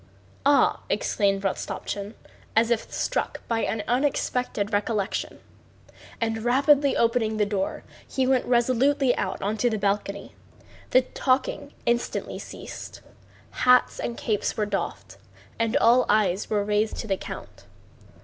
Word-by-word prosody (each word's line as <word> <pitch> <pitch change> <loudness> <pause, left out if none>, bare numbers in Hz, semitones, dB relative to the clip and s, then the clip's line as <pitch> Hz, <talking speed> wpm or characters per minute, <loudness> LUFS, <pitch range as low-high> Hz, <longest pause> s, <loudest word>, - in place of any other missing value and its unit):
"Ah!" 285 0 +4
exclaimed 195 -1 +1
Rostopchín, 200 +2 -3 0.4
as 225 +1 +3
if 230 - -1
struck - - -2
by 230 -1 0
an 220 -1 -1
unexpected 250 -5 0
recollection. 205 -1 -1 0.8
And 225 -1 -1
rapidly 275 +3 +4
opening 230 -2 +1
the 210 - +3
door 200 -2 -2 0.2
he 265 - 0
went 260 -1 +2
resolutely 255 +2 +3
out 190 - -3
onto 215 +4 +1
the 220 - -1
balcony. 200 0 -2 0.6
The 255 - +5
talking 260 +2 -1
instantly 235 0 -1
ceased, - - -9 0.5
hats 250 0 +3
and 235 - -3
caps 210 -3 -1
were 210 - +1
doffed, 200 -1 -4 0.4
and 230 +3 +2
all 250 -1 +5
eyes 205 -3 +2
were 210 -2 +1
raised 210 +1 0
to 225 - -5
the 195 - +1
count. - - -9
225 Hz, 130 wpm, -25 LUFS, 205-250 Hz, 0.8 s, The